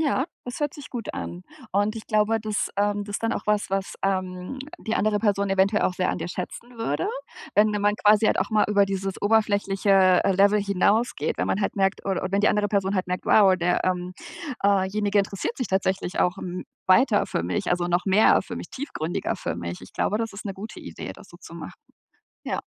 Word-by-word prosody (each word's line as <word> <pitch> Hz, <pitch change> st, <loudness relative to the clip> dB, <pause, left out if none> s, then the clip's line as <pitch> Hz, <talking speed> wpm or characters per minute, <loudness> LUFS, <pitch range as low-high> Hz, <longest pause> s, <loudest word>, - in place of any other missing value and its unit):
Ja, 285 Hz, -3 st, +1 dB, 0.2 s
das 245 Hz, +4 st, -6 dB
hört 290 Hz, -2 st, 0 dB
sich 285 Hz, -5 st, -10 dB
gut 235 Hz, -3 st, -5 dB
an. 175 Hz, +1 st, -6 dB, 0.3 s
Und 205 Hz, +3 st, +1 dB
ich 220 Hz, -, -8 dB
glaube, 215 Hz, +1 st, +2 dB
dass, 215 Hz, -1 st, -2 dB
ähm 205 Hz, 0 st, +1 dB
das 205 Hz, 0 st, -4 dB
dann 230 Hz, +1 st, -1 dB
auch -, -, -3 dB
was 210 Hz, -1 st, +1 dB
was, 195 Hz, 0 st, -2 dB
ähm, 185 Hz, +5 st, -2 dB, 0.2 s
die 225 Hz, -, -3 dB
andere 210 Hz, 0 st, +1 dB
Person 200 Hz, -2 st, +1 dB
eventuell 195 Hz, +2 st, +3 dB
auch 180 Hz, -, +1 dB
sehr 185 Hz, 0 st, 0 dB
an -, -, -3 dB
dir 175 Hz, -, -4 dB
schätzen 235 Hz, +7 st, -7 dB
würde, 225 Hz, -, -1 dB, 0.5 s
wenn 215 Hz, +1 st, +5 dB
man 205 Hz, 0 st, +2 dB
quasi 210 Hz, +1 st, +4 dB
halt -, -, +2 dB
auch 190 Hz, -, +1 dB
mal 215 Hz, -1 st, +3 dB
über 200 Hz, -1 st, +4 dB
dieses 195 Hz, 0 st, -3 dB
oberflächliche, 205 Hz, -2 st, +1 dB, 0.3 s
äh, -, -, +2 dB
Level 200 Hz, +2 st, +4 dB
hinausgeht, 200 Hz, +4 st, +1 dB
wenn -, -, -1 dB
man 205 Hz, -, 0 dB
halt -, -, -1 dB
merkt 195 Hz, -1 st, 0 dB
o -, -, 0 dB
oder 185 Hz, -, -1 dB
wenn 200 Hz, +1 st, +2 dB
die 210 Hz, -, +4 dB
andere 205 Hz, -1 st, +1 dB
Person 200 Hz, -1 st, 0 dB
halt 185 Hz, -1 st, -1 dB
merkt, 180 Hz, 0 st, -3 dB
wow, 195 Hz, -3 st, +6 dB
der 175 Hz, 0 st, +1 dB
ähm, 180 Hz, 0 st, -1 dB, 0.5 s
äh, 195 Hz, -1 st, +3 dB
Jenige 205 Hz, 0 st, 0 dB
interessiert 195 Hz, +3 st, -1 dB
sich 255 Hz, -, -2 dB
tatsächlich 190 Hz, -1 st, -1 dB
auch 180 Hz, +2 st, +1 dB
m 180 Hz, -1 st, -5 dB, 0.2 s
weiter 210 Hz, +2 st, +4 dB
für -, -, -2 dB
mich, 85 Hz, 0 st, -2 dB
also 175 Hz, 0 st, +1 dB
noch 175 Hz, +3 st, 0 dB
mehr 200 Hz, +3 st, +5 dB
für -, -, -7 dB
mich, -, -, -8 dB
tiefgründiger 175 Hz, -, -3 dB
für -, -, -4 dB
mich. 85 Hz, 0 st, -5 dB
Ich 95 Hz, -, -13 dB
glaube, 210 Hz, -, 0 dB
das 225 Hz, -1 st, -3 dB
ist 200 Hz, -, -9 dB
'ne 195 Hz, -2 st, -4 dB
gute 210 Hz, +3 st, -8 dB
Idee, -, -, -7 dB
das -, -, -16 dB
so -, -, -14 dB
zu -, -, -11 dB
machen. -, -, -8 dB, 0.7 s
Ja. -, -, -2 dB
200 Hz, 220 wpm, -25 LUFS, 190-215 Hz, 0.7 s, wow